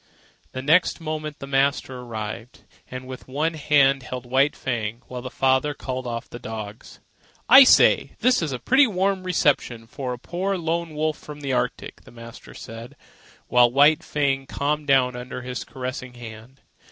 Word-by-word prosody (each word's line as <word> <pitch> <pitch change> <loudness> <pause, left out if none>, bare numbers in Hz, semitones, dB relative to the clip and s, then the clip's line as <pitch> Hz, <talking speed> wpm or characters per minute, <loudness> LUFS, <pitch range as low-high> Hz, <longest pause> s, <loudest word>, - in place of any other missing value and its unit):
The 130 - -5
next 165 +7 +3
moment 155 -2 -5
the - - -8
master 135 -1 0
arrived, 115 -1 -7 0.3
and 130 0 -7
with 130 0 -9
one 150 +5 -1
hand 140 -3 +3
held 125 -1 -7
White 135 +4 +2
Fang, 115 -2 -4
while 125 -1 -7
the 130 - -6
father 135 +3 +1
called 130 -2 -5
off 115 -1 -5
the 120 - -10
dogs. 110 -2 -8 0.5
"I 265 +4 +10
say, - - +5
this 255 -2 +2
is 160 -4 -2
a 130 - -3
pretty 265 - +4
warm 195 -1 0
reception 145 -9 0
for 125 +2 -6
a 125 - -4
poor 185 +8 -3
lone 165 -1 -3
wolf 155 0 -1
from 150 -1 -10
the 140 -2 -2
Arctic," 125 0 -3
the - - -17
master 115 0 -12
said, 115 +2 -10 0.5
while 125 -1 +4
White 145 +4 +5
Fang 135 -2 -1
calmed 150 +1 -2
down 130 -2 +3
under 125 0 -7
his 125 0 -5
caressing 130 -1 -7
hand. 115 +2 -11
135 Hz, 170 wpm, -23 LUFS, 125-150 Hz, 0.5 s, I